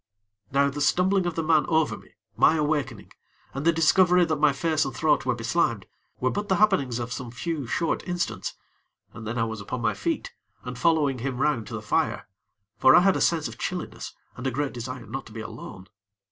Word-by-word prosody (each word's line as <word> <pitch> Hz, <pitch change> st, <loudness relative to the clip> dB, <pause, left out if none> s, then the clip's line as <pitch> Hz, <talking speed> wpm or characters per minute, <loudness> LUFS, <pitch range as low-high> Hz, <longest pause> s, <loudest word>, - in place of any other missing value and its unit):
Now 140 Hz, +1 st, +3 dB
the 145 Hz, +1 st, -5 dB
stumbling 180 Hz, +4 st, +2 dB
of 170 Hz, -, -3 dB
the 165 Hz, -, -1 dB
man 155 Hz, -1 st, +3 dB
over 160 Hz, -2 st, +2 dB
me, -, -, -17 dB, 0.2 s
my 160 Hz, -, +5 dB
awakening, 145 Hz, -7 st, -2 dB, 0.4 s
and 135 Hz, +3 st, -4 dB
the 170 Hz, -, +6 dB
discovery 175 Hz, +2 st, +4 dB
that 160 Hz, -2 st, -1 dB
my 150 Hz, -1 st, +5 dB
face 155 Hz, +2 st, 0 dB
and 135 Hz, -4 st, -5 dB
throat -, -, +1 dB
were -, -, +2 dB
be -, -, -8 dB
slimed, -, -, 0 dB, 0.3 s
were 130 Hz, -, +1 dB
but 205 Hz, 0 st, -3 dB
the 190 Hz, -, +3 dB
happenings 190 Hz, -, +2 dB
of 120 Hz, 0 st, -4 dB
some 125 Hz, -1 st, -6 dB
few, 145 Hz, +2 st, -4 dB
short 165 Hz, +8 st, 0 dB
instants; 175 Hz, -1 st, -3 dB, 0.6 s
and 110 Hz, -1 st, -8 dB
then 115 Hz, +2 st, -3 dB
I 115 Hz, -, +2 dB
was 110 Hz, -2 st, -4 dB
upon 120 Hz, +4 st, -5 dB
my 110 Hz, -2 st, +1 dB
feet, 100 Hz, +1 st, -3 dB, 0.3 s
and 125 Hz, 0 st, -6 dB
following 145 Hz, -1 st, +2 dB
him 130 Hz, +1 st, -3 dB
round 130 Hz, -5 st, 0 dB
to -, -, -6 dB
the -, -, -6 dB
fire; -, -, 0 dB, 0.5 s
for 130 Hz, -, +7 dB
I -, -, +8 dB
had 195 Hz, +1 st, +4 dB
a -, -, -1 dB
sense 165 Hz, -3 st, +2 dB
of -, -, -11 dB
chilliness -, -, -5 dB, 0.2 s
and 130 Hz, +1 st, -4 dB
a -, -, +2 dB
great 140 Hz, +2 st, -2 dB
desire 125 Hz, +1 st, -6 dB
not 135 Hz, +5 st, -6 dB
to 110 Hz, -, -13 dB
be 110 Hz, -, -6 dB
alone. 110 Hz, -4 st, -9 dB
140 Hz, 215 wpm, -26 LUFS, 125-165 Hz, 0.6 s, I